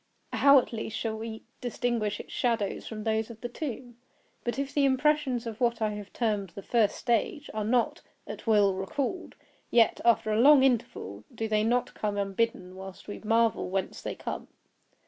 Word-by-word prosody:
How 280 0 +7
at 250 - +1
least 220 -1 -4
shall 220 -1 -2
we 220 0 -6 0.2
distinguish 235 -4 -1
its - - -9
shadows 230 -5 -1
from 215 -1 -6
those 220 0 0
of 230 -2 -10
the 240 - -3
tomb? 245 -2 -6 0.5
But 240 - -2
if 275 0 -3
the 290 - +2
impressions 270 -2 +2
of 225 0 -6
what 235 -1 +2
I 215 -1 +1
have 210 -1 -7
termed 210 -5 -1
the 200 - -7
first 225 -2 +2
stage 255 +5 -1
are 215 0 -2
not, 250 +8 +1 0.2
at - - -8
will, 205 -3 +5
recalled, 270 - -3 0.3
yet, 230 -1 +4
after 220 -2 +3
long 270 +4 +7
interval, 160 - 0
do 225 - -2
they 215 -1 +2
not 240 +2 +1
come 210 -1 -2
unbidden, 195 -2 -1
while 190 0 -8
we 205 - -6
marvel 225 -2 +2
whence 190 0 -2
they - - -4
come? - - -5
225 Hz, 180 wpm, -28 LUFS, 210-245 Hz, 0.5 s, How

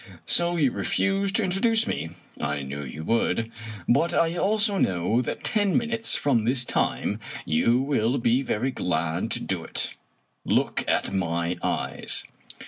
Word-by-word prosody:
So 175 0 +3
you 145 -6 +2
refuse 195 +6 0
to 220 - +1
introduce 220 +5 +2
me! 80 - -3 0.3
I 75 -1 -2
knew 70 +2 -5
you 70 +4 -7
would. 115 +3 0 0.4
But 140 +8 +2
I 165 0 +2
also 205 +1 +2
know 95 +6 +1
that 125 - -5
ten 205 -3 +2
minutes 230 -1 +2
from 125 -6 +2
this 120 +1 +1
time - - -1 0.3
you 115 +10 +2
will 135 -2 +1
be 120 +1 +2
very 130 0 -1
glad 85 -5 -1
to - - 0
do - - -3
it. - - 0 0.5
Look - - +1
at - - 0
my 85 -2 -1
eyes!" - - -1
125 Hz, 150 wpm, -25 LUFS, -, 0.5 s, So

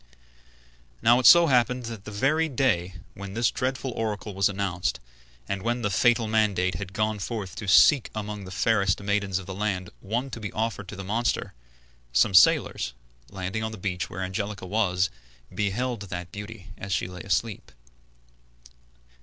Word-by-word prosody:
Now 120 +2 +6
it 130 - +5
so 170 0 +9
happened 125 -3 +2
that 115 -3 -7
the - - -6
very 150 +10 +1
day 105 - 0 0.2
when 100 0 -8
this 120 0 +2
dreadful 130 0 -2
oracle 110 -2 -3
was 95 +1 +2
announced, 95 -3 -2 0.5
and 100 -1 -3
when 120 +2 -1
the 105 - 0
fatal 120 +3 +3
mandate 105 -4 +1
had 95 +3 -6
gone 110 +1 0
forth 100 -1 -5
to 105 - -6
seek 125 +7 +6
among 105 -1 -5
the - - -9
fairest 100 -1 +1
maidens 100 -2 0
of 95 - -6
the 95 - -6
land 95 -3 -2
one 120 +7 -3
to 120 - -6
be 105 -2 -5
offered 110 -3 -2
to 105 - -8
the 95 - -6
monster, 115 +5 -1 0.6
some - - +3
sailors, 65 -7 +4 0.4
landing 95 +2 -4
on 110 0 -2
the - - -7
beach 90 -2 -3
where 95 +2 -5
Angelica 95 +1 -4
was, 90 -2 +1 0.4
beheld 115 +3 -1
that 90 -3 -6
beauty 105 0 -9
as 100 - -6
she 90 - 0
lay 90 -1 -8
asleep. 100 - -2
105 Hz, 170 wpm, -26 LUFS, 95-115 Hz, 0.6 s, so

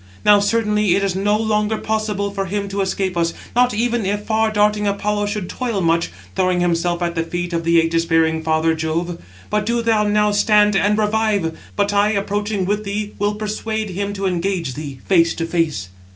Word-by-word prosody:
Now, 205 0 +7
certainly, 210 -2 +2
it 200 - 0
is 195 -2 0
no 205 +2 +1
longer 215 0 0
possible 215 -2 -2
for 195 -1 -3
him 200 +2 -2
to 200 0 -2
escape 190 -1 -1
us, 170 -1 0 0.2
not 245 0 +4
even 235 +1 0
if 205 +2 -2
far 220 0 +1
darting 210 0 +2
Apollo 205 +1 -1
should 205 -3 -3
toil 235 -3 -3
much, 165 -1 +1 0.3
throwing 185 -1 +1
himself 175 0 0
at 170 0 -1
the 165 - -1
feet 175 +1 -4
of 165 0 -1
the 170 0 +4
ægis 165 0 0
bearing 160 0 +2
father 160 0 +1
Jove. 165 +2 -3 0.3
But 210 0 0
do 235 0 0
thou 225 -2 +2
now 210 0 +2
stand 210 0 +3
and 205 +2 +2
revive; 210 -5 0 0.2
but 205 0 +1
I, 205 +1 +3
approaching 205 0 -1
with 205 +2 -1
thee, 205 +1 -4
will 205 +1 0
persuade 215 0 -3
him 200 +2 -3
to 195 -1 -4
engage 180 -5 -1
thee 140 -1 -7
face 170 -3 +3
to 165 - -2
face." 165 - -1
200 Hz, 195 wpm, -19 LUFS, 170-210 Hz, 0.3 s, Now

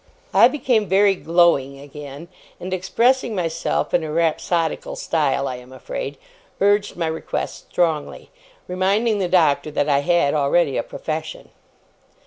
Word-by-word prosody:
I - - +7
became 245 -8 0
very 195 +2 +4
glowing 165 -6 +2
again, 145 +2 -10 0.3
and, 185 +1 -5
expressing 235 +6 +1
myself 170 -3 -2
in 170 - +2
a 155 - -4
rhapsodical 165 0 -1
style, 140 -4 0
I 125 - -4
am 125 +1 -14
afraid, - - -6 0.4
urged 205 +1 +2
my 170 - -2
request 160 0 -4
strongly; 160 -4 -1 0.4
reminding 200 +4 +1
the 185 - 0
Doctor 160 -5 +3
that 145 -1 -1
I 140 -2 +3
had 145 -1 +2
already 145 0 +2
a - - +1
profession. 155 0 -6
170 Hz, 135 wpm, -21 LUFS, 150-190 Hz, 0.4 s, I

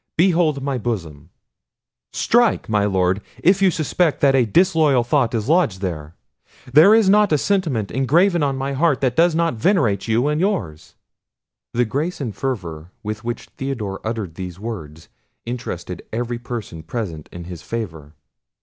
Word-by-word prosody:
"Behold 165 -5 +2
my 135 -2 -1
bosom; 85 -11 -5 0.8
strike, 240 -2 +2
my 105 -2 +1
Lord, 95 0 +1 0.2
if 185 +3 +4
you 195 - +5
suspect 160 -1 0
that 140 -1 +4
a 130 -3 +3
disloyal 155 - +3
thought 125 -1 +1
is 110 0 -2
lodged 155 - +2
there. 85 -4 -5 0.6
There 170 +9 +8
is 225 -3 +4
not 205 0 +4
a 150 - +4
sentiment 150 - 0
engraven 165 - +2
on 140 -2 0
my 135 +1 -2
heart 145 -1 +1
that 130 -2 +1
does 165 +1 +4
not 165 0 +1
venerate 120 - +1
you 115 +5 +2
and 150 +2 0
yours." 100 - -2 0.8
The 120 +1 +3
grace 150 +10 -3
and 120 -8 -4
fervour 90 - -4
with 110 0 -5
which 120 +1 -5
Theodore 115 -8 -4
uttered 110 -6 -4
these 90 0 -7
words 80 -9 -7 0.4
interested 90 -7 -5
every 120 +1 -3
person 115 -9 -6
present 85 -3 -5
in 85 - -8
his 85 -1 -8
favour. 80 -10 -6
120 Hz, 160 wpm, -21 LUFS, 95-155 Hz, 0.8 s, There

